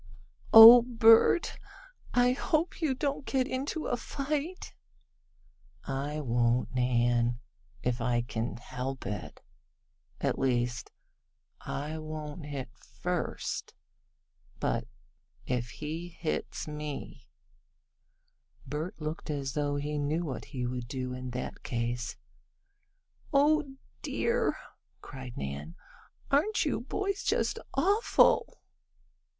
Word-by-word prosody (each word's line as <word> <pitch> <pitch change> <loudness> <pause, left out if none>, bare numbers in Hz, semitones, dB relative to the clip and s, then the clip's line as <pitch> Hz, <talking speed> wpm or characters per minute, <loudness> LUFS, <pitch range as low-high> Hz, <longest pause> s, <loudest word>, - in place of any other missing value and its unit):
"Oh, 230 +2 +12
Bert, 230 +5 +5 0.5
I 245 0 +4
hope 310 +7 -1
you 290 -5 +1
don't 280 +1 -2
get 265 -1 0
into 280 +4 -3
fight." 295 +7 -4 1.1
"I 140 +3 -3
won't, 120 -1 +1
Nan 120 -1 +2 0.5
if 125 0 -1
I 120 0 +1
can 120 0 -4
help 125 +2 -5
it. 105 0 -6 0.8
At - - -1
least 125 -2 0 0.7
I 150 +3 -4
won't 155 0 -7
hit 135 -4 -5
first, 180 -1 -4 0.8
but - - -1 0.6
if 125 -1 -2
he 155 +6 -5
hits 165 -2 -4
me 150 -1 -7 0.6
" - - -39
Bert 150 +6 -5
looked 155 +1 -5
as 140 -3 -2
though 145 -1 0
he 145 +1 -2
knew 155 +4 -1
what 130 -7 -5
he 125 -2 -4
would 125 -1 -4
do 130 0 -4
in 125 0 -6
that 125 +1 -5
case. 120 0 -3 1.1
"Oh 290 -1 +3 0.3
dear!" 470 -1 0 0.4
cried 130 -3 -9
Nan, 70 +4 -5 0.6
"aren't 325 +10 +2
you - - -1
boys 395 -1 -2
just - - 0 0.2
awful!" 400 - +3
150 Hz, 105 wpm, -30 LUFS, -, 1.1 s, Oh